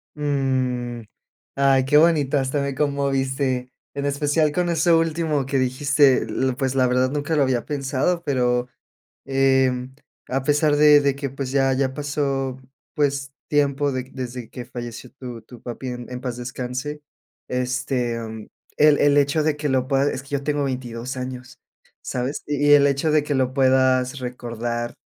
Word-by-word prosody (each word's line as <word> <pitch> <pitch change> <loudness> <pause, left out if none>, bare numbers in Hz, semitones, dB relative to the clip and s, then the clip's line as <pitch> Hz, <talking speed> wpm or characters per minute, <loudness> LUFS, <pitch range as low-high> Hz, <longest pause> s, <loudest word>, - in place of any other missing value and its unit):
Mm. 130 -4 -1 0.5
Ay, 135 -1 +3
qué 150 +2 +4
bonito, 150 -4 +4
hasta 135 +1 0
me 140 -1 -2
conmoviste. 135 -2 -1 0.2
En 140 0 -3
especial 145 +2 +1
con 175 +2 0
eso 165 0 +3
último 160 -4 0
que 135 0 -1
dijiste, 135 +1 +3
eh, 130 -1 -1
pues, 135 -2 -1
la 130 -1 +3
verdad 130 +1 +1
nunca 150 +2 -1
lo 145 - +4
había 130 -3 0
pensado 145 +4 -1
pero, 125 -3 +1 0.6
em, 130 -1 +1 0.3
a 130 +1 -1
pesar 150 +1 +2
de 150 0 +7
de 140 -1 +1
que, 140 -1 -4
pues, 135 -1 -5
ya 135 -1 +2
ya 130 0 0
pasó, 140 -3 -2 0.4
pues, 140 -2 0 0.2
tiempo 145 -1 +1
de 130 -1 -2
desde 125 -2 -6
que 125 - -8
falleció 120 0 -8
tu 125 -4 -8
tu 120 +1 -14
papi, 125 +2 -7
en 125 0 -7
en 125 - -5
paz 125 -2 -4
descanse, 125 +4 -5 0.5
este, 125 -1 -1
mm, 110 -1 -7 0.3
el 150 -1 +5
el 145 0 +4
hecho 145 +2 +2
de 155 -1 +1
que 145 -1 -2
lo 130 -1 +1
puedas 135 0 +2
es 130 - -5
que 140 - -17
yo 140 -1 -1
tengo 145 -1 0
22 125 -1 -4
años, 130 +2 -7 0.4
¿sabes?, 130 +4 -3
y 145 0 0
y - - +8
el 140 -1 +6
hecho 140 +3 +1
de 150 -1 +3
que 150 - -2
lo 130 -1 0
puedas 130 0 +2
recordar 120 -1 -4
135 Hz, 170 wpm, -22 LUFS, 125-145 Hz, 0.6 s, y